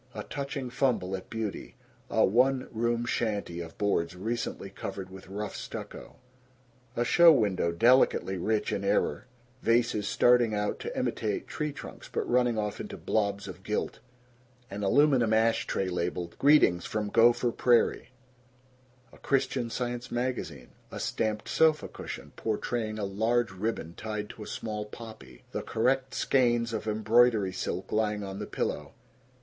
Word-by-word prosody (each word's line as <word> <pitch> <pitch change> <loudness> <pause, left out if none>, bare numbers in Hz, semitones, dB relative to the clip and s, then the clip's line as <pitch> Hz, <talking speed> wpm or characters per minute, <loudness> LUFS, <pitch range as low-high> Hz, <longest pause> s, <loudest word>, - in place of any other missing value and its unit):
A - - -4
touching 140 -3 -5
fumble 115 -8 0
at 95 - -9
beauty. 110 -3 -5 0.3
A - - +4
one 130 +5 +2
room 120 +1 0
shanty 105 -7 -2
of 85 -1 -8
boards 90 -4 0
recently 110 0 -4
covered 95 -1 -6
with 95 0 -11
rough 100 +2 -5
stucco. - - -8 0.8
A 120 - +1
show 170 +6 +7
window 100 - +2
delicately 115 -1 +4
rich 105 +4 0
in - - -2
error: 75 +13 0 0.3
vases 115 -3 +2
starting 120 -2 +4
out 105 0 -1
to - - -6
imitate 105 -2 -1
tree 150 -1 -3
trunks 140 - -10
but - - -2
running 125 -2 +2
off 105 -1 -2
into - - -7
blobs 100 -2 -1
of - - -9
gilt - - -3 0.7
an 100 +1 -5
aluminum 120 +2 +4
ash 115 +1 +2
tray 95 - -1
labeled 90 -1 -3
"Greetings 140 -12 +5
from 105 -1 -2
Gopher 120 +2 +4
Prairie" 120 +2 +2 1.0
a - - -16
Christian 130 -3 0
Science 120 0 -4
magazine 120 - -3 0.2
a - - -6
stamped 110 -1 -2
sofa 160 -1 +3
cushion - - -8
portraying 110 0 -2
a 105 - -2
large 115 +4 +1
ribbon 95 -4 -3
tied 105 +1 -5
to - - -13
a 105 - -7
small 105 -1 -4
poppy, 110 - -11
the - - -3
correct 130 +2 0
skeins 120 -3 +2
of 110 0 -3
embroidery 110 -2 +3
silk 95 0 -4
lying 105 -1 0
on 95 0 -6
the - - -5
pillow. - - -3
110 Hz, 150 wpm, -29 LUFS, 100-120 Hz, 1.0 s, show